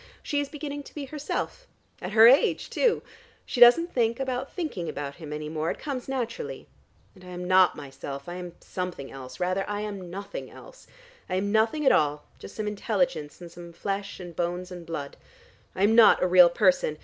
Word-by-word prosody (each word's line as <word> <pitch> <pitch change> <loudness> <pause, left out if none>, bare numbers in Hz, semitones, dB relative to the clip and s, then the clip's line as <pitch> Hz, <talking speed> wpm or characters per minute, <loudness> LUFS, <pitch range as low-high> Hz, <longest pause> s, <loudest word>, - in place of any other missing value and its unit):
She 290 - -1
is 285 -1 -2
beginning 290 -1 -6
to - - -14
be 290 -2 -5
herself, 300 - -4 0.3
at - - -5
her 220 +1 +9
age 265 +4 +4
too! 485 -3 +2 0.4
She 250 - -4
doesn't 290 +9 +7
think 235 -1 +1
about 265 0 -3
thinking 300 - -4
about 140 -1 -5
him 155 -3 -9
any 150 0 -4
more: 155 +1 -2
it - - -3
comes 270 -5 -5
naturally. 230 - -4 0.5
And 185 - -18
I - - -13
am 180 0 -6
not 185 0 +5
myself: 140 0 -8
I 175 - -5
am 180 -1 -7
something 180 -7 -5
else: 130 -1 -10
rather, 185 +2 0
I 205 0 -2
am 200 -4 -6
nothing 200 - -7
else: - - -15 0.4
I - - -1
am 200 +2 -1
nothing 225 +8 +2
at - - +7
all, 150 0 +1
just - - -11
some 215 - -3
intelligence, 210 - -1
and 170 -1 -10
some 170 0 -11
flesh 195 +3 -4
and 175 -2 -9
blood 175 +2 -3
and 175 -2 -9
bones. 145 -4 -5 0.6
I 190 - 0
am 210 +2 +5
not 230 -4 +7
a - - +3
real 180 -1 +7
person. 180 -5 +2
190 Hz, 200 wpm, -26 LUFS, 170-245 Hz, 0.6 s, her